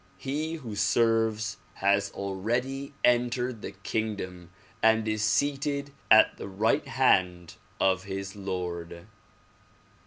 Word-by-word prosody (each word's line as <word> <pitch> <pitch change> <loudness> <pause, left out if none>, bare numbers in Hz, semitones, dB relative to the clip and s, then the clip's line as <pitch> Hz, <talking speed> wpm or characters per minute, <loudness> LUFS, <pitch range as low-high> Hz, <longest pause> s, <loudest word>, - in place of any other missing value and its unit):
He 155 +4 -3
who 120 -9 -7
serves 110 +1 +1 0.2
has 100 +1 +2
already 120 +9 -3
entered 120 -1 +1
the - - -5
kingdom 95 -3 -4 0.3
and 110 0 +4
is 110 0 0
seated 140 +4 0 0.2
at 110 - +6
the - - -6
right 105 +4 +1
hand 90 -2 +2 0.3
of 95 0 +2
his 95 0 -5
Lord. 90 -3 -5
110 Hz, 105 wpm, -28 LUFS, 95-120 Hz, 0.3 s, at